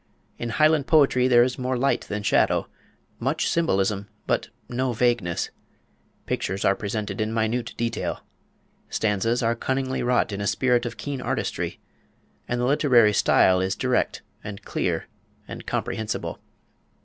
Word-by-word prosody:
In 120 - -3
Highland 155 +2 +3
poetry 135 -5 +4
there 120 -2 +6
is 125 +1 -2
more 130 0 -1
light 135 +3 +1
than 105 0 -3
shadow, - - +2 0.5
much - - 0
symbolism, 100 - +1 0.2
but - - 0 0.2
no 125 +1 -1
vagueness; 120 -7 0 0.7
pictures 95 +1 -2
are 95 - +4
presented 105 -1 -3
in 110 0 -1
minute 115 +2 -1
detail; 115 0 -2 0.7
stanzas 110 +3 0
are 115 +1 +2
cunningly 130 +2 -1
wrought 125 -2 +1
in 100 0 -4
a 100 - -1
spirit 125 0 +2
of - - -7
keen 140 -3 -4
artistry; - - -2 0.7
and 120 - -1
the 120 - +1
literary 125 -6 +4
style 95 -2 +4
is 95 +1 0
direct 130 +2 0 0.2
and 100 -1 -7
clear - - -1 0.4
and - - -9
comprehensible. 110 -1 -3
120 Hz, 140 wpm, -25 LUFS, 105-130 Hz, 0.7 s, there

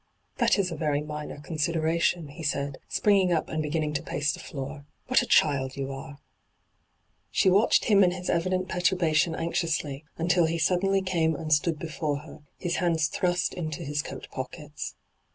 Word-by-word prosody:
' - - -42
That - - +4
is 190 -3 0
a - - -3
very 150 -2 0
minor 150 -1 -6
consideration,' 160 +1 0
he 155 +4 -10
said, 140 -2 -2
springing 195 -3 +3
up 165 -2 0
and 155 - -1
beginning 150 0 -1
to 145 - -1
pace 150 +2 -1
the - - -7
floor. 140 +1 -6
' - - -44
What 255 - +4
a 245 - -4
child 135 -3 +3
you 135 0 -3
are 135 +1 -8 0.6
!' - - -45 0.3
She 190 - +3
watched 200 +4 +4
him 200 -2 +6
and 180 - +4
his 180 0 -6
evident 185 +2 0
perturba 180 -2 +1
tion 160 +1 +3
anxiously, 160 -4 -1
until 170 0 +3
he 165 +1 -1
suddenly 190 +4 +2
came 165 -4 +1
and 155 +1 0
stood 155 +2 +2
before 155 -2 -3
her, 155 0 -12 0.2
his 175 -2 -2
hands 165 -3 +1
thrust 180 -1 0
into 155 -4 -4
his 145 +1 -1
coat 135 -4 -8
pockets. 150 +3 -6
160 Hz, 190 wpm, -27 LUFS, 150-180 Hz, 0.6 s, him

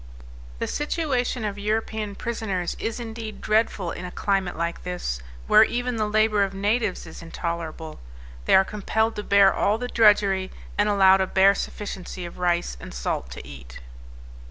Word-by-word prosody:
The - - -2
situation 270 -6 -1
of 205 -1 -4
European 215 0 -2
prisoners 200 -7 -3
is 225 +2 -3
indeed 225 -2 -7
dreadful 215 -5 +1
in - - -7
a 180 - -5
climate 190 -1 -1
like 170 +1 -2
this, 175 - -4 0.2
where 215 - +7
even 245 +1 -1
the 215 -1 0
labor 215 -1 +3
of 195 0 -3
natives 205 0 0
is 160 - -10
intolerable; 165 -1 -5 0.5
they - - +5
are 190 - +6
compelled 220 +2 -1
to 210 - -3
bear 200 -1 +5
all 210 +2 +1
the 245 +1 -4
drudgery, 200 -5 +4 0.3
and 205 0 +2
allowed 190 -1 +5
a 190 - +1
bare 195 +1 +5
sufficiency 190 -4 -5
of 175 - -10
rice 175 - 0
and - - -9
salt 60 +1 -3
to - - -9
eat." 65 -4 -11
200 Hz, 165 wpm, -24 LUFS, 180-220 Hz, 0.5 s, where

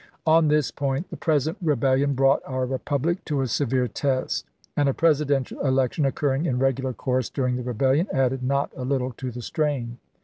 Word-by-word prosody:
On 160 0 +5
this 150 -2 +2
point 140 +4 -2
the - - -5
present 160 +3 0
rebellion 140 -2 +2
brought 135 +1 +3
our 130 -1 -2
republic 145 +6 -1
to 145 -3 -1
a 130 - 0
severe 125 0 0
test, 130 +3 -1 0.3
and 145 -1 +2
a 135 - -1
Presidential 145 -5 +1
election 135 +1 +1
occurring 140 +3 0
in 125 - 0
regular 135 0 0
course 130 0 -1
during 125 -3 -1
the 125 - -3
rebellion 130 - +1
added 135 -1 +1
not 140 +2 0
a 130 - -5
little 130 -1 -1
to 130 - -4
the 120 0 -7
strain. 130 -6 -2
135 Hz, 180 wpm, -24 LUFS, 130-145 Hz, 0.3 s, On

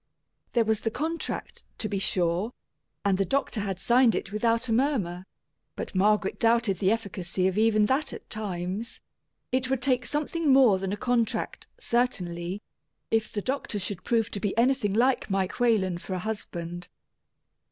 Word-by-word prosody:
There 235 -2 +3
was 220 -1 +1
the 225 - -1
contract, 315 +8 -4 0.2
to 215 - -2
be 200 -1 -2
sure, 180 +3 +1 0.5
and 195 -1 +2
the - - +4
doctor 270 0 -1
had 195 -3 -3
signed 240 +2 +4
it - - -3
without 230 +3 +1
a 225 - +1
murmur; 210 -9 0 0.5
but - - -5
Margaret 205 +1 +2
doubted 230 -4 +3
the 190 - +3
efficacy 195 -4 -1
of 190 - -1
even 215 0 +4
that 270 +5 +1
at - - -9
times 200 +1 -4 0.5
it 260 0 +1
would 265 -1 +1
take 255 -3 +1
something 300 +2 0
more 255 -8 +6
than 190 0 -3
a 205 - -2
contract, 235 -1 -1
certainly, 195 - -1 0.5
if 225 -1 +1
the 205 - -3
doctor 265 -5 -2
should 190 -2 -4
prove 225 -2 +1
to 200 - -3
be 205 +1 -2
anything 235 -4 +2
like 250 +2 +2
Mike 195 +1 -1
Whalen 200 -7 +2
for 185 - -5
a 180 - -5
husband. 175 -5 -5
215 Hz, 165 wpm, -27 LUFS, 190-245 Hz, 0.5 s, more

